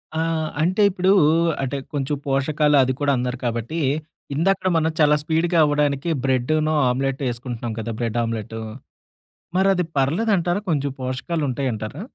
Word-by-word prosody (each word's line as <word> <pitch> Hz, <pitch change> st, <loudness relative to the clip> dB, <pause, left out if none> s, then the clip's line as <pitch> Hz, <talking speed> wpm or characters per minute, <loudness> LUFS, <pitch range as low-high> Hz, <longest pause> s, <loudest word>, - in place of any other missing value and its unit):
ఆ! -, -, 0 dB, 0.4 s
అంటే 185 Hz, +6 st, +1 dB
ఇప్పుడూ, 185 Hz, 0 st, +1 dB, 0.5 s
అంటే 135 Hz, +1 st, -2 dB, 0.2 s
కొంచెం 145 Hz, 0 st, -1 dB
పోషకాలు 145 Hz, +2 st, +2 dB
అది 130 Hz, 0 st, 0 dB
కూడా 145 Hz, -1 st, +2 dB
అన్నారు 125 Hz, +1 st, -2 dB
కాబట్టి, 120 Hz, +7 st, -2 dB, 0.6 s
ఇందాకడ 185 Hz, +4 st, +1 dB
మనం 160 Hz, 0 st, +1 dB
చాలా 150 Hz, -1 st, +5 dB
స్పీడ్‌గా 165 Hz, +2 st, +1 dB
అవ్వడానికి 145 Hz, +1 st, 0 dB, 0.2 s
బ్రెడ్డునూ, 150 Hz, +4 st, +1 dB, 0.2 s
ఆమ్లెట్ 135 Hz, +2 st, -1 dB
ఎసుకుంటున్నాం 120 Hz, -1 st, -5 dB
కదా! 115 Hz, +1 st, -4 dB
బ్రెడ్ 115 Hz, 0 st, -1 dB
ఆమ్లెటు 115 Hz, -1 st, -4 dB, 1.0 s
మరి 190 Hz, +1 st, +3 dB
అది 180 Hz, -1 st, 0 dB
పర్లేదంటారా? 175 Hz, +5 st, +1 dB
కొంచెం 145 Hz, -3 st, 0 dB
పోషకాలుంటాయంటారా? 130 Hz, -, -3 dB
145 Hz, 130 wpm, -22 LUFS, 125-165 Hz, 1.0 s, చాలా